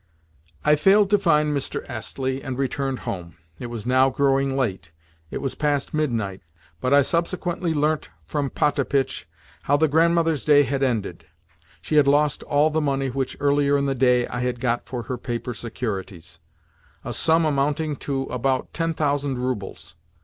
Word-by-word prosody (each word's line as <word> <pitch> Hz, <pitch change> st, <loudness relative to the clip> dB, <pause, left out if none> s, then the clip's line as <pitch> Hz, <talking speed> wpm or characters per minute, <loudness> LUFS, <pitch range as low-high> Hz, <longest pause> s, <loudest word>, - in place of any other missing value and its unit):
I 150 Hz, 0 st, +6 dB
failed 195 Hz, +6 st, +4 dB
to 205 Hz, -, +5 dB
find 150 Hz, -5 st, +2 dB
Mr. 140 Hz, -, -3 dB
Astley, 130 Hz, +2 st, -4 dB
and 130 Hz, -3 st, -5 dB
returned 135 Hz, 0 st, -2 dB
home. 85 Hz, -3 st, -5 dB, 0.2 s
It 125 Hz, -, -5 dB
was 115 Hz, -2 st, -6 dB
now 130 Hz, +2 st, +4 dB
growing 135 Hz, 0 st, +1 dB
late—it 80 Hz, -, -5 dB
was 135 Hz, -2 st, -3 dB
past 145 Hz, 0 st, -1 dB
midnight, 115 Hz, -11 st, -1 dB, 0.4 s
but 125 Hz, -, -1 dB
I 140 Hz, 0 st, +6 dB
subsequently 175 Hz, +2 st, -1 dB
learnt 150 Hz, +1 st, 0 dB, 0.2 s
from 145 Hz, -2 st, -2 dB
Potapitch 140 Hz, -2 st, 0 dB, 0.3 s
how 145 Hz, +9 st, +2 dB
the 160 Hz, +2 st, +3 dB
Grandmother's 165 Hz, -1 st, +2 dB
day 145 Hz, -1 st, +6 dB
had 140 Hz, 0 st, -2 dB
ended. 100 Hz, -11 st, -2 dB, 0.6 s
She 155 Hz, -, 0 dB
had 145 Hz, -2 st, +5 dB
lost 145 Hz, +1 st, +3 dB
all 150 Hz, +2 st, +2 dB
the 160 Hz, +1 st, +1 dB
money 135 Hz, -2 st, 0 dB
which, 135 Hz, 0 st, -3 dB
earlier 145 Hz, 0 st, +3 dB
in 140 Hz, -, 0 dB
the 135 Hz, -, +1 dB
day, 125 Hz, -1 st, +3 dB
I 125 Hz, -, -5 dB
had 125 Hz, -1 st, -2 dB
got 120 Hz, -1 st, -1 dB
for 125 Hz, -2 st, -4 dB
her 125 Hz, +2 st, -5 dB
paper 120 Hz, 0 st, -4 dB
securities—a 85 Hz, -8 st, -8 dB
sum 165 Hz, 0 st, +2 dB
amounting 150 Hz, +1 st, 0 dB
to 135 Hz, -2 st, -2 dB
about 130 Hz, 0 st, -2 dB
ten 165 Hz, -1 st, -1 dB
thousand 145 Hz, -3 st, 0 dB
roubles. 100 Hz, -10 st, -4 dB
135 Hz, 160 wpm, -23 LUFS, 120-150 Hz, 0.6 s, I